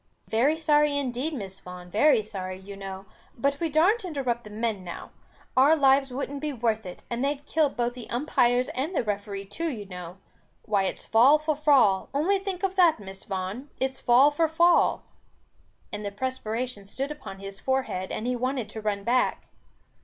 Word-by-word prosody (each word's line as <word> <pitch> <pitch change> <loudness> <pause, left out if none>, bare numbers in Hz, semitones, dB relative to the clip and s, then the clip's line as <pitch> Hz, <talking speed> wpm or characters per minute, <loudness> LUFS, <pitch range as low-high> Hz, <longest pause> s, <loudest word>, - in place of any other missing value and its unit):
"Very 265 +8 +2
sorry 295 -2 +3
indeed, 265 +2 -2
Miss 195 -9 -6
Vaughan, 180 -1 -10
very 240 +2 +4
sorry, 185 -3 -5
you 200 +1 -10
know. 195 0 -7 0.3
But 280 +3 0
we 330 - 0
darrn't 360 +10 +3
interrupt 260 -9 -2
the - - -9
men 215 -2 -2
now. 175 -1 -8 0.4
Our 275 +5 +6
lives 270 -2 +4
wouldn't 275 +2 -4
be 300 -1 -2
worth 220 -5 -1
it, 180 - -9
and 240 +2 -3
they'd 285 +1 -1
kill 310 -2 +2
both 240 -2 -2
the 245 -2 -10
umpires 250 -1 +2
and 295 +8 -3
the - - +1
referee 200 -2 -4
too 325 +12 -3
you 220 -8 -5
know. 180 -1 -8 0.5
Why 200 -2 +1
it's - - -4
fall 250 +7 +6
for 305 0 -1
fall, 275 -10 +3
only 375 +8 +2
think 385 -1 -5
of 385 -1 0
that, 340 -8 +5
Miss 195 -1 -10
Vaughan, 195 +9 -4
it's 265 0 -1
fall 260 +4 +5
for 320 +2 +2
fall!" 340 +2 +3 0.9
And 210 0 -5
the 205 - -2
perspiration 235 -1 -4
stood 270 +8 -4
upon 265 -10 -8
his 195 0 -8
forehead, 260 -8 -1
and 220 - -3
he 250 0 0
wanted 255 -2 -2
to 220 +1 -7
run 205 -2 -2
back. 250 +3 0
250 Hz, 185 wpm, -26 LUFS, 205-290 Hz, 0.9 s, Our